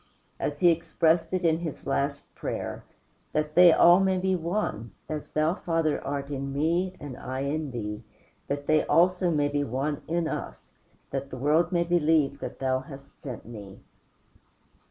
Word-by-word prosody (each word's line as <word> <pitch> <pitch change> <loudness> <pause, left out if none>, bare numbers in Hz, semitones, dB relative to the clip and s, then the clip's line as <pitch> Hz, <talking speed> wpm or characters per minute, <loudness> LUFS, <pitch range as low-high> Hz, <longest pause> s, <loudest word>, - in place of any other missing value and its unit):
As 145 0 -3
He 175 -1 +7
expressed 165 0 +1
it 185 -1 -1
in 160 0 +3
his 165 -4 -6
last 140 +1 -2
prayer: - - -5 0.5
"That 150 0 -1
they 175 +1 +8
all 175 +2 +7
may 190 -1 +2
be 190 0 +1
one, 165 - -3
as 155 -1 -5
Thou, 155 +2 +1
Father, 165 -5 -1
art 140 0 -4
in 140 0 -3
me 170 +6 0
and 140 -3 -7
I 130 +1 -5
in 145 +2 -2
Thee, 105 -3 -5 0.4
that 145 0 -3
they 155 +1 +3
also 180 +1 +3
may 150 -3 +2
be 145 0 0
one 140 +4 -2
in 170 0 0
us: - - -6 0.4
that 135 0 -3
the 130 - -7
world 155 +6 +2
may 170 -1 +2
believe 160 -4 +2
that - - -6
Thou 130 -1 0
hast 135 +1 -13
sent 125 -5 -7
me." 105 -4 -10
150 Hz, 170 wpm, -27 LUFS, 140-170 Hz, 0.5 s, they